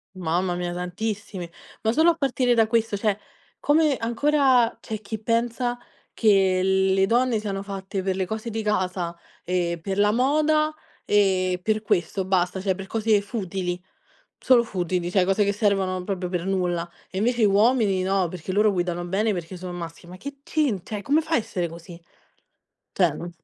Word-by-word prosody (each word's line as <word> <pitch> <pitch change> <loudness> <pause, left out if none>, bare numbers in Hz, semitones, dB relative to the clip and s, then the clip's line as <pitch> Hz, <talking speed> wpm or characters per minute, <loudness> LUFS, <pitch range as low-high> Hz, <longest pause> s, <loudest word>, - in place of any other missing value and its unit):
Mamma 175 +1 -1
mia 175 0 -3
tantissimi, 185 0 -4 0.3
ma 220 - +3
solo 320 +7 +4
a 330 - -4
partire 255 -4 +1
da 225 -1 +5
questo, 225 -2 +1
cioè 210 -1 0 0.4
come 295 -2 +3
ancora, 255 0 +2
c'è 215 -1 -5
chi 215 +1 -5
pensa, 240 +2 0 0.4
che 195 -4 +3
le 190 0 +3
donne 240 +2 +2
siano 200 -2 -3
fatte 195 -1 -5
per 190 0 -1
le 190 - -1
cose 220 +4 -4
di 220 0 -3
casa, 185 -4 -1 0.3
e 175 -2 -1
per 195 +3 -3
la 205 0 +4
moda 305 +5 +2 0.3
e 185 -3 +2
per 215 +2 0
questo 185 0 0
basta, 185 0 +1
cioè 190 -1 +1
per 195 +1 -8
cose 220 -1 +2
futili, 190 -4 -3 0.6
solo 245 -2 +4
futili, 180 -4 -2
cioè 185 0 +3
cose 195 +3 +2
che 200 - +1
servono 195 -3 0
proprio 185 -1 -3
per 175 0 -3
nulla. 180 -3 -1 0.2
E 190 - -4
invece 235 +3 +1
i - - +6
uomini 205 -1 +3
no, 190 -1 +1
perché 175 +1 -7
loro 210 +2 +3
guidano 175 -1 -2
bene 210 +4 +1
perché 180 -1 -5
sono 180 0 -7
maschi, 170 -1 -8
ma 180 - -9
che 280 +9 -8
centra, 245 - -1
cioè 205 - -6
come 295 +8 +3
fa 320 +1 -3
a - - +6
essere 195 -7 -2
così, 170 +1 -11 0.9
cioè 175 -5 +3
n 170 +3 -7
195 Hz, 175 wpm, -24 LUFS, 180-225 Hz, 0.9 s, i